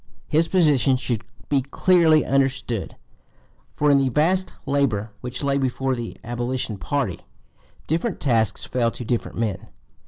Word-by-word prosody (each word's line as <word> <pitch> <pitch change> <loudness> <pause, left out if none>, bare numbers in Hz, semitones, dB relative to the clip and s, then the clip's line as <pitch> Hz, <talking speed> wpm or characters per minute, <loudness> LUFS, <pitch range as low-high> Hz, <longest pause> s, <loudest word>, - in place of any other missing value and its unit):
His 160 +2 +2
position 145 -8 +3
should 120 -3 -2 0.2
be 140 -2 +2
clearly 160 +2 +3
understood; 135 -6 0 0.8
for 150 0 +3
in 140 - +5
the 135 -1 +1
vast 180 +8 +1
labor 130 -7 0
which 125 +2 -4
lay 140 0 +1
before 130 0 0
the 120 -2 -5
abolition 120 -2 -3
party 130 - -2 0.7
different 170 +7 -1
tasks 115 -6 +1
fell 120 -2 +1
to 120 - -8
different 120 +1 -2
men. 105 -5 -2
130 Hz, 135 wpm, -23 LUFS, 120-145 Hz, 0.8 s, in